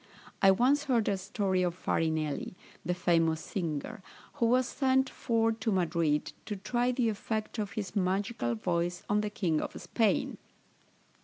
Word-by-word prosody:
I 195 - +7
once 260 +9 +3
heard 240 -6 +2
a 200 - +2
story 190 0 -1
of 175 -1 0
Farinelli, 160 -2 -1 0.3
the 180 - -1
famous 165 -3 +2
singer, 175 +4 -4 0.4
who 230 - +5
was 250 +1 +3
sent 265 -1 +1
for 225 -1 +1
to 220 0 -2
Madrid, 165 -5 +1
to 210 - -2
try 240 +5 0
the 245 -1 +1
effect 220 +1 -3
of 205 -2 -3
his 205 -1 -4
magical 190 - 0
voice 175 +7 -1
on 210 +1 +2
the 210 - -2
king 170 -7 0
of - - -5
Spain. 225 -3 0
200 Hz, 155 wpm, -30 LUFS, 170-225 Hz, 0.4 s, I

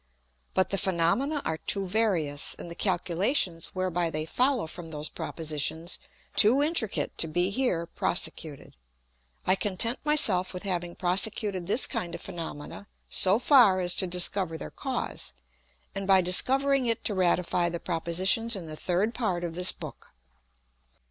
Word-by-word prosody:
But 185 - +3
the 195 - +1
Phænomena 195 - +1
are 160 0 -2
too 195 -1 +1
various, 180 -8 +1
and 170 - -9
the - - -4
Calculations 180 - 0
whereby 180 -2 -1
they 155 -1 -4
follow 250 - +1
from 165 +1 -8
those 150 -1 -4
Propositions 160 +2 -3 0.4
too 240 +7 +6
intricate 295 - -1
to 165 - +3
be 175 +4 0
here 200 -8 -1
prosecuted. 160 -4 -1 0.7
I - - +4
content 210 +5 +2
my 300 0 +2
self 185 - +3
with 180 - -6
having 175 -3 -3
prosecuted 185 0 +1
this 220 +6 +3
kind 170 -1 -4
of - - -10
Phænomena 170 +1 -8 0.2
so 190 +2 +4
far 240 -7 +5
as 180 -1 +2
to 185 - -1
discover 180 -1 +1
their - - -8
Cause, - - -4 0.6
and 195 0 -5
by 190 -1 +5
discovering 265 +8 +1
it 230 -1 -1
to 210 - 0
ratify 180 -1 +1
the 170 0 -5
Propositions 185 +7 +1
in 185 -4 -7
the 155 -1 -8
third 185 +8 -1
Part 190 -8 -2
of 170 -1 -4
this 180 +2 +2
Book. - - -11
185 Hz, 155 wpm, -27 LUFS, 170-215 Hz, 0.7 s, too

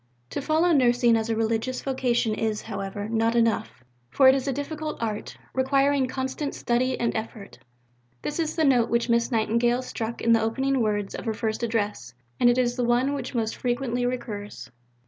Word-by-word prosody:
To - - -3
follow 320 +4 +2
nursing 245 -3 +4
as 225 0 -1
a 225 - +1
religious 225 +3 -1
vocation 245 -4 0
is, 215 -1 -2
however, 200 -1 -5
not 225 +1 +1
enough; 225 - 0 0.3
for 265 - +5
it 260 - +8
is 270 0 -1
a - - +1
difficult 305 +3 -4
art, 215 -2 -4 0.2
requiring 275 +1 +2
constant 265 +2 -3
study 255 +2 0
and 235 - 0
effort. 220 -2 -6 0.6
This 295 - -3
is 315 -1 -1
the 320 - +1
note 245 -4 +3
which 235 +1 0
Miss 235 +2 +2
Nightingale 235 +2 +1
struck 230 -2 -5
in 230 - +2
the 225 -1 +5
opening 265 +4 0
words 205 -2 -1
of - - -6
her 220 -1 -1
first 220 0 -2
Address 205 - -2 0.2
and 240 - +5
it 240 - +3
is 245 0 +1
the 250 - 0
one 245 +4 +2
which 280 - -5
most 225 -2 -1
frequently 245 0 -1
recurs. 220 - -5
240 Hz, 185 wpm, -25 LUFS, 225-260 Hz, 0.6 s, it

